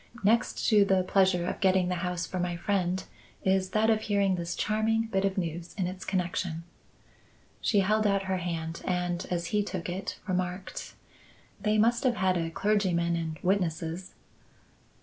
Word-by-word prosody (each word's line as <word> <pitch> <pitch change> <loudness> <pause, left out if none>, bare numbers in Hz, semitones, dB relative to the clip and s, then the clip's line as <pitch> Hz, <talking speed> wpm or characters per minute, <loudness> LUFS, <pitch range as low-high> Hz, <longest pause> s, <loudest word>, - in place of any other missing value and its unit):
Next 230 +4 +2
to 210 -3 +6
the 190 -2 +3
pleasure 185 -2 +3
of - - -3
getting 190 -2 +3
the 180 - 0
house 180 -1 -2
for 185 - -4
my 175 -1 -1
friend, 185 0 0 0.4
is 190 -1 +2
that 220 +3 +3
of 215 -1 +2
hearing 200 -3 +2
this 170 -1 -3
charming 220 +1 +1
bit 195 -3 0
of 195 0 -1
news 170 -1 -3
its 185 0 -3
connection." 175 -2 -2 1.0
She 205 -3 +3
held 215 +2 +2
out 200 -1 +2
her 190 0 -1
hand 165 -2 -4
and, 180 -1 -1
as 170 -1 -1
he 210 - +4
took 185 -4 -4
it, 185 +2 -4
remarked: 185 0 -3 0.7
"They 210 +1 +2
must 235 +4 +3
have 250 -3 +3
had 185 -2 +2
a 165 -2 -1
clergyman 175 -3 +1
and 160 -1 -3
witnesses." 180 -1 -1
185 Hz, 165 wpm, -29 LUFS, 175-200 Hz, 1.0 s, to